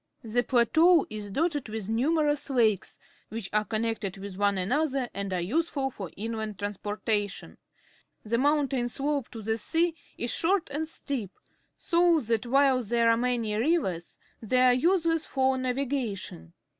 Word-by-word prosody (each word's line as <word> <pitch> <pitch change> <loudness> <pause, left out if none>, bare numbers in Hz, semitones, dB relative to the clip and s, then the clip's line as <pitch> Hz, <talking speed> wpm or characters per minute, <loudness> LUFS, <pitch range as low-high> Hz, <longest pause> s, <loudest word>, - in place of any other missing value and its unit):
The 235 +2 +1
plateau 315 +8 +4
is 210 -1 -6
dotted 290 - -1
with 215 -2 -4
numerous 290 +6 +1
lakes, 225 -7 +1 0.3
which 220 -2 -6
are 210 0 +3
connected 220 -3 -2
with 195 -1 -8
one 200 0 +1
another 265 +6 0
and 200 0 -4
are 185 - 0
useful 270 - -1
for 195 -7 -7
inland 220 -1 -4
trans 205 0 -4
portation. 205 -1 -3 0.7
The 230 +2 0
mountain 275 -3 +1
slope 280 0 -2
to 225 -2 -9
the 220 +2 -1
sea 330 +8 +1 0.2
is 235 - -1
short 355 -2 +1
and 310 +3 -2
steep, 265 - -4 0.5
so 340 -1 +3
that 230 +1 -1
while 270 0 +4
there 230 +1 +2
are - - +4
many 235 -3 0
rivers, 215 - 0 0.2
they 250 +3 +2
are 255 -1 +6
useless 330 +3 +2
for 265 -1 +1
na\'igation. 250 - -3
240 Hz, 150 wpm, -28 LUFS, 210-285 Hz, 0.7 s, are